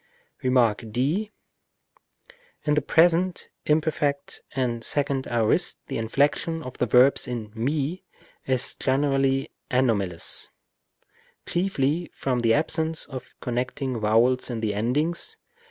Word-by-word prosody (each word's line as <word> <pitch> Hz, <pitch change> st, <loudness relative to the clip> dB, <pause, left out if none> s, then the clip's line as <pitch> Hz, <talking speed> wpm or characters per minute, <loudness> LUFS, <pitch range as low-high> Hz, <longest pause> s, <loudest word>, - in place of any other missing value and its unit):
Rem. 125 Hz, -4 st, +4 dB, 0.2 s
d. 145 Hz, -, 0 dB, 1.3 s
In 150 Hz, -, +1 dB
the 150 Hz, -, +2 dB
present, 175 Hz, +4 st, +2 dB, 0.2 s
imperfect, 150 Hz, -2 st, 0 dB
and 120 Hz, -3 st, -1 dB
second 140 Hz, -1 st, +1 dB
aorist, 115 Hz, -2 st, +1 dB
the -, -, -2 dB
inflection 145 Hz, +7 st, 0 dB
of 130 Hz, -, -8 dB
verbs 125 Hz, +4 st, +4 dB
in 115 Hz, -4 st, -5 dB
μὲ 140 Hz, -, -2 dB, 0.5 s
is 130 Hz, -1 st, +1 dB
generally 135 Hz, 0 st, +1 dB, 0.2 s
anomalous, 105 Hz, -9 st, +1 dB, 1.0 s
chiefly 170 Hz, -3 st, 0 dB
from 130 Hz, -2 st, -1 dB
the 115 Hz, -1 st, +3 dB
absence 160 Hz, +1 st, -1 dB
of 130 Hz, -3 st, -9 dB
connect 125 Hz, +1 st, -2 dB
ing 130 Hz, -3 st, -2 dB
vowels 115 Hz, +5 st, +3 dB
in 115 Hz, -2 st, -3 dB
the 110 Hz, -2 st, 0 dB
endings. 150 Hz, -, 0 dB
135 Hz, 110 wpm, -25 LUFS, 120-155 Hz, 1.3 s, Rem